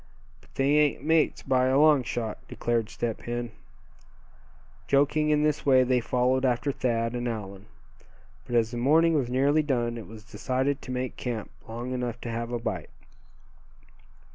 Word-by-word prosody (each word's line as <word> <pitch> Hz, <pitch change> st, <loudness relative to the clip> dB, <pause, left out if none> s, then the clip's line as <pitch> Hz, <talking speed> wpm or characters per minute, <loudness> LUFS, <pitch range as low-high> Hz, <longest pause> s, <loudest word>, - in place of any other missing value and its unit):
"But -, -, -25 dB
they 140 Hz, +2 st, +3 dB
ain't 145 Hz, -3 st, +1 dB
mates, 160 Hz, 0 st, +2 dB
by 130 Hz, -1 st, +2 dB
a 130 Hz, +1 st, +3 dB
long 150 Hz, -2 st, +5 dB
shot," 115 Hz, -2 st, -4 dB
declared 115 Hz, -2 st, -1 dB
Step 115 Hz, -2 st, -3 dB
Hen. 120 Hz, -1 st, -4 dB, 1.4 s
Joking 145 Hz, +2 st, +2 dB
in 150 Hz, 0 st, +3 dB
this 150 Hz, 0 st, 0 dB
way 130 Hz, -2 st, +5 dB
they 125 Hz, 0 st, +2 dB
followed 125 Hz, +2 st, +1 dB
after 125 Hz, +2 st, +1 dB
Thad 115 Hz, -3 st, -1 dB
and 120 Hz, 0 st, -3 dB
Allan. 100 Hz, -3 st, -6 dB, 0.8 s
But 120 Hz, -, -3 dB
as 115 Hz, -1 st, +2 dB
the 120 Hz, -, -5 dB
morning 160 Hz, +7 st, +4 dB
was 135 Hz, -6 st, 0 dB
nearly 140 Hz, +4 st, +3 dB
done 120 Hz, -5 st, -1 dB
it 110 Hz, -, -10 dB
was 110 Hz, 0 st, -11 dB
decided 130 Hz, +4 st, -2 dB
to 130 Hz, -, -8 dB
make 125 Hz, 0 st, -3 dB
camp 120 Hz, -4 st, -4 dB, 0.2 s
long 120 Hz, +3 st, -5 dB
enough 120 Hz, -2 st, -3 dB
to 120 Hz, -, -5 dB
have 115 Hz, +1 st, -4 dB
a 120 Hz, -, -1 dB
bite. 115 Hz, -, -4 dB
125 Hz, 165 wpm, -27 LUFS, 120-140 Hz, 1.4 s, long